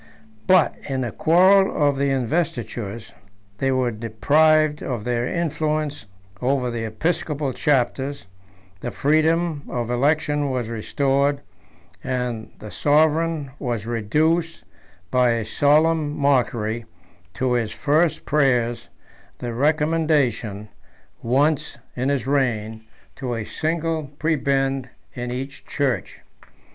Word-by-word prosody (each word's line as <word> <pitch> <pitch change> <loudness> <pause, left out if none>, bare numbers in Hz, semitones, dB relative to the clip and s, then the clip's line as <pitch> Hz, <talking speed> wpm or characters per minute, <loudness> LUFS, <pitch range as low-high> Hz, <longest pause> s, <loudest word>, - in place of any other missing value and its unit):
But 185 -4 +4
in 135 -1 -1
the 120 -3 -2
quarrel 180 - +4
of 140 - +2
the 140 +1 0
investitures, 120 - -2 0.5
they 135 - +1
were 130 -2 +1
deprived 150 +8 +2
of 120 -5 -3
their 120 0 -1
influence 155 -6 -2 0.3
over 125 -1 +1
the 115 -1 -3
episcopal 150 +3 -2
chapters; 140 +1 0 0.5
the - - -4
freedom 155 +1 +1
of 120 -1 -3
election 145 +2 +1
was 125 -3 -2
restored, 140 +5 0 0.6
and 125 -4 -3
the 105 - -10
sovereign 155 0 +2
was 120 -5 -3
reduced, 155 +9 0 0.5
by 125 -2 +3
a 115 -2 -2
solemn 150 +4 +2
mockery, 120 -5 +1 0.5
to 130 -1 0
his 115 -3 0
first 150 +8 +1
prayers, 125 -5 +1 0.5
the 120 -1 -5
recommendation, 145 -7 +1 0.5
once 140 +5 +1 0.2
in 130 +2 -1
his 140 -4 0
reign, 115 -6 0 0.4
to 125 -3 -3
a 115 - -3
single 160 +4 -2
prebend 135 -4 0 0.2
in 125 0 -5
each 135 +3 -6
church. 140 -3 -2
135 Hz, 110 wpm, -22 LUFS, 120-155 Hz, 0.6 s, But